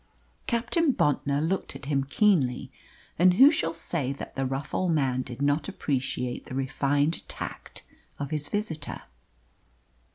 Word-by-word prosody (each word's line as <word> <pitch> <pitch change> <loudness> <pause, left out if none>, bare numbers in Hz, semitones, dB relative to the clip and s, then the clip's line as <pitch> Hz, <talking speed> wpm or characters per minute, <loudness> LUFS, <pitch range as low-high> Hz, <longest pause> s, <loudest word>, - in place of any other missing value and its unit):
Captain 255 +7 +2
Bontnor 145 - +1
looked 190 +2 -2
at - - -9
him 140 -1 +1
keenly; 140 - +2 0.5
and 180 +1 +6
who 270 +8 +8
shall 165 - 0
say 165 -4 -2
that 140 - -7
the 135 -1 0
rough 135 +2 -4
old 180 -3 +1
man 130 -4 +1
did 130 +1 -6
not 145 +2 +1
appreciate 125 -3 -2
the 130 - -7
refined 140 +3 +1
tact - - -7 0.3
of 140 +1 -5
his 150 -1 -2
visitor? 165 -8 -4
145 Hz, 140 wpm, -27 LUFS, 135-175 Hz, 0.5 s, who